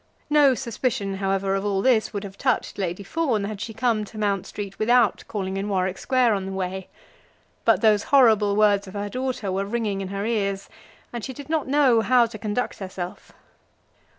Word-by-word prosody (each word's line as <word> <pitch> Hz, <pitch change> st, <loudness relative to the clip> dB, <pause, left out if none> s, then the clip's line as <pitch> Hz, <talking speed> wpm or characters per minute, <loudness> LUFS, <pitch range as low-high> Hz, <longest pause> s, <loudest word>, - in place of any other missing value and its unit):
No 290 Hz, -3 st, +5 dB
suspicion, 230 Hz, -5 st, -2 dB
however, 195 Hz, 0 st, 0 dB
of 195 Hz, 0 st, -1 dB
all 200 Hz, -2 st, 0 dB
this 245 Hz, -4 st, +3 dB
would 205 Hz, -2 st, -4 dB
have 195 Hz, -1 st, -8 dB
touched 255 Hz, -1 st, -1 dB
Lady 185 Hz, +1 st, -3 dB
Fawn 245 Hz, -2 st, -1 dB
had 205 Hz, 0 st, -5 dB
she 230 Hz, -, -4 dB
come 225 Hz, -1 st, 0 dB
to 215 Hz, -, -12 dB
Mount 200 Hz, -2 st, -1 dB
Street 200 Hz, -2 st, -7 dB
without 235 Hz, 0 st, +3 dB
calling 195 Hz, -2 st, -3 dB
in 200 Hz, +2 st, -3 dB
Warwick 185 Hz, -1 st, -1 dB
Square 255 Hz, -3 st, +2 dB
on 195 Hz, -2 st, -2 dB
the -, -, -5 dB
way. 190 Hz, 0 st, -4 dB, 0.8 s
But -, -, +4 dB
those 215 Hz, -2 st, +3 dB
horrible 220 Hz, -7 st, +4 dB
words 205 Hz, -1 st, +3 dB
of 190 Hz, -, -10 dB
her 205 Hz, 0 st, -3 dB
daughter 255 Hz, -5 st, -3 dB
were 195 Hz, +1 st, -1 dB
ringing 205 Hz, -2 st, -2 dB
in 190 Hz, -, -4 dB
her 200 Hz, +2 st, -4 dB
ears, 200 Hz, -4 st, -1 dB, 0.4 s
and 240 Hz, -2 st, -5 dB
she 260 Hz, -, -5 dB
did 285 Hz, +2 st, -10 dB
not 315 Hz, -3 st, 0 dB
know 265 Hz, -5 st, +4 dB
how 245 Hz, +1 st, +4 dB
to 220 Hz, -2 st, -8 dB
conduct 215 Hz, +4 st, -3 dB
herself. 185 Hz, 0 st, -7 dB
210 Hz, 195 wpm, -24 LUFS, 195-240 Hz, 0.8 s, No